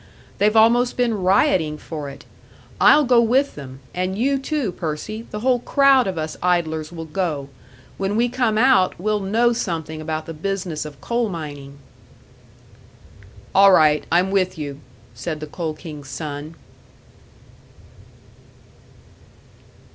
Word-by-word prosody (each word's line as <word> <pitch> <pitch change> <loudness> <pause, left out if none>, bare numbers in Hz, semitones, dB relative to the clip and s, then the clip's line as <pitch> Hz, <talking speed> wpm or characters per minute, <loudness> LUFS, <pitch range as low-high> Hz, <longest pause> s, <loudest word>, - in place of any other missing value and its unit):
They've 210 +2 +3
almost 235 +3 +4
been 235 -5 0
rioting 185 - +2
for 150 -2 -7
it. 140 - -12 0.5
I'll 300 - +6
go 245 -2 +5
with 260 +5 +2
them 135 -2 -10
and 185 +2 -2
you, 270 +4 +1
too, 275 - -2
Percy 180 +8 -5
the 210 - -6
whole 250 0 +2
crowd 275 -1 +4
of 185 -3 -3
us 155 0 -4
idlers 160 -3 0
will 165 -1 -7
go! 155 -4 -3 0.5
When 195 +1 -1
we 235 +2 +2
come 240 -3 0
out, 230 -8 +3
we'll 210 +2 0
know 225 +5 +2
something 160 -7 -4
about 155 0 -4
the 165 - -7
business 180 -2 -3
of 145 -3 -10
coal 235 +5 -1
mining!" 145 -5 -7 1.8
"All 195 0 +7
right, 150 -3 +4
I'm 180 +3 +3
with 185 -2 0
you," 145 -2 -6 0.3
said 150 +7 -5
the 155 - -5
Coal 155 0 -5
King's 150 -4 -10
son. 150 +1 -6
180 Hz, 135 wpm, -21 LUFS, 155-225 Hz, 1.8 s, All